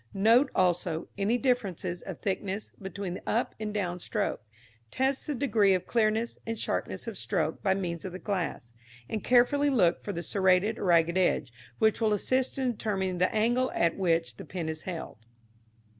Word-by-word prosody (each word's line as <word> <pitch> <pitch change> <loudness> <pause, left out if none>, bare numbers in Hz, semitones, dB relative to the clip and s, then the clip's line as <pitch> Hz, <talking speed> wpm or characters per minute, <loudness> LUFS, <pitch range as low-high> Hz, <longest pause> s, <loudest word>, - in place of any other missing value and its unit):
Note, 230 +7 +5
also, 175 -2 +1
any 205 +4 +1
difference 245 -8 0
of 175 0 -5
thickness 200 0 -3
between 190 -1 -5
the - - -7
up 230 - 0
and 215 -1 -3
down 180 -4 -2
stroke; 205 - -2 0.5
test 265 - 0
the 295 - -1
degree 215 -7 +3
of 185 0 -3
clearness 225 0 0
and 225 0 -4
sharpness - - -3
of - - -5
stroke - - -1
by 190 -2 +2
means 170 -4 -3
of 190 - -5
the 180 - -6
glass, 175 - -3 0.3
and 215 - -3
carefully 255 +4 +4
look 190 -11 +3
for 205 - -3
the 170 -3 -4
serrated 190 +4 +2
or - - -3
ragged 170 0 +4
edge, 175 -9 +1 0.2
which 220 0 +2
will 215 -2 +3
assist 255 +6 0
in 260 -2 +1
determining 190 -5 -2
the 185 - +3
angle 240 +4 +2
at 170 0 +2
which 165 - 0
the - - -8
pen 170 -4 -4
is 160 0 -4
held. 165 - -6
195 Hz, 180 wpm, -29 LUFS, 180-225 Hz, 0.5 s, Note